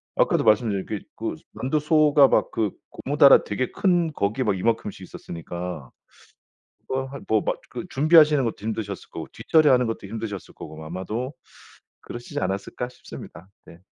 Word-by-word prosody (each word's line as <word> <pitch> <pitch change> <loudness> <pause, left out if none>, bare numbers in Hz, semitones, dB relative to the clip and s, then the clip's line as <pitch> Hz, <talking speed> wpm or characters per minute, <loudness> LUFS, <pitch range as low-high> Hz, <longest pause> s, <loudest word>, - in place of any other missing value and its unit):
아까도 - - +2
말씀드린 105 -3 +2
그 105 - -3 0.2
그 - - -4 0.2
만두소가 150 +1 +4
막 - - +2
그 110 -3 0 0.2
고무다라 140 0 +5
되게 125 +5 -2
큰 175 -4 +1
거기에 110 +2 -1
막 105 -5 0
이만큼씩 105 -1 -1
있었으니까. 85 -4 -7 1.0
뭐 130 0 -1
한 140 +1 -9
뭐 110 -1 +3
막 - - -2
그 - - -6
준비하시는 150 -1 +5
것도 115 - -1
힘드셨을 105 -2 -4
거고 - - -6
뒷처리하는 140 -6 +3
것도 115 -2 -4
힘드셨을 105 -2 -6
거고 80 0 -10
아마도 105 - -4 0.7
그러시지 120 0 -6
않았을까 95 +6 -3
싶습니다. 95 -6 -11 0.2
네. 85 - -15
115 Hz, 355 characters per minute, -24 LUFS, 100-140 Hz, 1.0 s, 고무다라